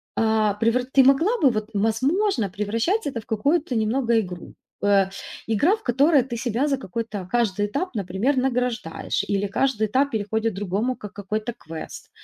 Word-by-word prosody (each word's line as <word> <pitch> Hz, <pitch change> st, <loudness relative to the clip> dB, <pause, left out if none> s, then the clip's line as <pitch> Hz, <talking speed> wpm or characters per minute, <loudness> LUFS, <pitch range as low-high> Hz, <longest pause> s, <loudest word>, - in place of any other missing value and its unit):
А, 220 Hz, -2 st, +2 dB
превра 230 Hz, +3 st, +1 dB
ты 265 Hz, +1 st, +4 dB
могла 325 Hz, -, +4 dB
бы, 275 Hz, -, +6 dB
вот, 215 Hz, -1 st, -3 dB
возможно, 225 Hz, -, +1 dB
превращать 230 Hz, -, -1 dB
это 250 Hz, -5 st, -3 dB
в -, -, -23 dB
какую-то 280 Hz, +6 st, 0 dB
немного 230 Hz, +1 st, +2 dB
игру. 180 Hz, -4 st, -6 dB, 0.3 s
Э, 200 Hz, -1 st, +4 dB, 0.4 s
игра, 290 Hz, -, +3 dB
в 440 Hz, -, -17 dB
которой 275 Hz, +3 st, +4 dB
ты 240 Hz, -2 st, -5 dB
себя 245 Hz, +3 st, 0 dB
за 275 Hz, -2 st, +1 dB
какой-то 210 Hz, -3 st, -5 dB
каждый 210 Hz, -4 st, +1 dB
этап, 285 Hz, -, -3 dB
например, 205 Hz, +8 st, 0 dB
награждаешь, 250 Hz, -8 st, -1 dB
или 200 Hz, 0 st, +1 dB
каждый 220 Hz, 0 st, 0 dB
этап 275 Hz, +6 st, +1 dB
переходит 220 Hz, +1 st, -1 dB
другому 205 Hz, +6 st, -1 dB
как 210 Hz, -4 st, -10 dB
какой-то 215 Hz, +3 st, -4 dB
квест. 160 Hz, -5 st, -9 dB
225 Hz, 160 wpm, -23 LUFS, 205-265 Hz, 0.4 s, бы